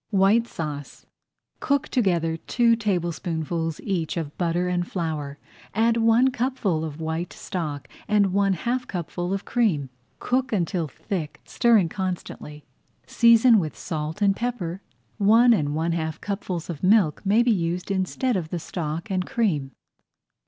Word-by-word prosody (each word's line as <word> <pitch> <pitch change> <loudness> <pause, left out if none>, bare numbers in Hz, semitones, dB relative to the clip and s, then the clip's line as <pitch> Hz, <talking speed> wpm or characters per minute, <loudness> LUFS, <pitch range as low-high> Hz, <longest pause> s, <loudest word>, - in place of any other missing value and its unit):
WHITE 210 +3 +3
SAUCE 150 - -6 0.5
Cook 280 -2 0
together 175 -9 +1
two 230 +7 +2
tablespoonfuls 170 -5 -2
each 175 -5 -2
of 155 -3 -4
butter 175 0 0
and 175 -1 -1
flour, 155 -5 -3 0.4
add 230 +2 +3
one 230 +3 +4
cupful 235 -10 -1
of 155 -1 -6
white 160 +2 -3
stock 150 -6 -5 0.2
and 205 -3 +3
one 200 0 +3
half 245 +7 -2
cupful 175 0 -4
of 195 0 -2
cream. 170 - 0 0.3
Cook 260 +1 -1
until 175 -4 0
thick, 155 +1 -5
stirring 225 -7 +3
constantly. 175 -5 -5 0.4
Season 235 -1 +5
with 155 -4 -4
salt 155 +4 -4
and 195 -1 +4
pepper. 200 -7 -3 0.4
One 225 +4 +6
and 150 -8 0
one 165 +2 0
half 160 -1 -2
cupfuls 195 -4 -4
of 165 -5 -6
milk 190 -5 +3
may 210 +4 +4
be 240 - +3
used 180 -1 -1
instead 195 +6 0
of 170 -4 -2
the 175 - -3
stock 165 +2 -4
and 185 -1 0
cream. 160 - 0
180 Hz, 145 wpm, -24 LUFS, 160-220 Hz, 0.5 s, One